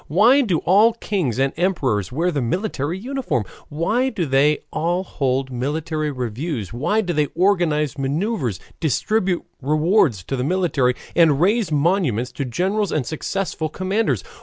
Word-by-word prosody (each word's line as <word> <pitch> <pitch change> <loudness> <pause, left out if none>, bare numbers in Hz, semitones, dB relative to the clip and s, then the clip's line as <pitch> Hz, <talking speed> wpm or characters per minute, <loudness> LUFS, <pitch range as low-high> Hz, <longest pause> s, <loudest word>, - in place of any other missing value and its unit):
Why 230 - +5
do 195 -10 +1
all 210 +6 +5
kings 185 - -2
and 135 +1 +1
emperors 135 - 0
wear 170 +7 0
the 145 -4 -1
military 170 - -2
uniform? 240 - -2 0.3
Why 215 - 0
do 200 -9 -2
they 140 +2 +3 0.2
all 175 +3 0
hold 135 -5 -1
military 150 +4 -2
reviews, 125 - -4
why 150 - +1
do 180 -4 -2
they 150 -2 +1
organize 165 -6 +1
maneuvers, 140 - -1 0.2
distribute 180 - 0 0.2
rewards 150 - +2
to 135 - -3
the 125 - -2
military, 150 -6 +1 0.2
and 160 -5 +4
raise 200 +1 +2
monuments 145 - +1
to 135 +2 -4
generals 190 - -1
and 145 -5 -1
successful 160 +2 -3
commanders? 185 - -1
155 Hz, 145 wpm, -21 LUFS, 135-190 Hz, 0.3 s, Why